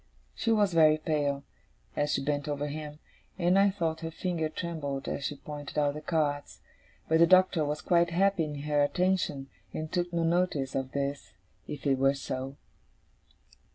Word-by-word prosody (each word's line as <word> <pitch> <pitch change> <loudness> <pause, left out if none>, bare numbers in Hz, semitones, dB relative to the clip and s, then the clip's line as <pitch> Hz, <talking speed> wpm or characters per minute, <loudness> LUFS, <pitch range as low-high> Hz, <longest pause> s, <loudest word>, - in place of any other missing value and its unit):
She 230 - -1
was 205 -4 +3
very 155 -2 +6
pale, 145 -3 -1 0.5
as 145 0 0
she 135 - 0
bent 145 0 -1
over 145 -1 -2
him, 150 0 -6 0.4
and 180 +1 +3
I 200 0 +5
thought 165 -5 -2
her 165 - -3
finger 165 -1 -2
trembled 155 -5 -4
as 140 - -3
she 145 - -2
pointed 145 0 -8
out 145 -1 +2
the 150 - -7
cards; 150 -3 -1 0.5
but 160 0 +3
the 170 - +7
Doctor 185 -2 +5
was 150 +1 -2
quite 170 -1 +3
happy 190 0 +2
in 145 -2 -5
her 150 0 +1
attention, 180 -3 +1 0.3
and 155 0 -4
took 175 -1 -1
no 170 -1 0
notice 165 -5 +1
of 135 -1 -3
this, 140 0 -3 0.3
if 145 -1 -7
it 135 -2 +2
were 135 +1 +4
so. 135 0 -5
155 Hz, 175 wpm, -29 LUFS, 145-170 Hz, 0.5 s, the